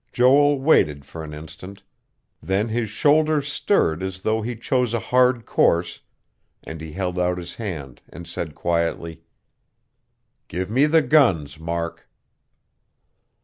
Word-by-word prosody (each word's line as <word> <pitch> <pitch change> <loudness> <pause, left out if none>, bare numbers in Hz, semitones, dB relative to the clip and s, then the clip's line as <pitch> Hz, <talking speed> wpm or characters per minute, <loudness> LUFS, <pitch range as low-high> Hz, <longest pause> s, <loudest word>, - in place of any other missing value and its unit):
Joel 140 +3 +4
waited 75 - +2
for 80 +3 -9
an 75 - -8
instant; 80 +6 -10 0.6
then 100 +4 -1
his 110 -1 -2
shoulders 150 +5 +2
stirred 115 - +1
as 95 0 -5
though 110 +2 0
he 120 +2 -4
chose 120 +1 0
a - - 0
hard 125 +2 +2
course, 85 +1 +1 0.6
and 80 0 -8
he 80 -1 -8
held 90 0 -3
out 90 0 0
his 85 -1 -8
hand 75 - -6
and 85 - -10
said 80 -3 -5
quietly: 85 -1 -2 1.3
"Give 95 +4 -4
me 135 +6 +4
the 160 0 +4
guns, 115 - +2
Mark." 85 +1 -5
95 Hz, 135 wpm, -22 LUFS, 85-125 Hz, 1.3 s, Joel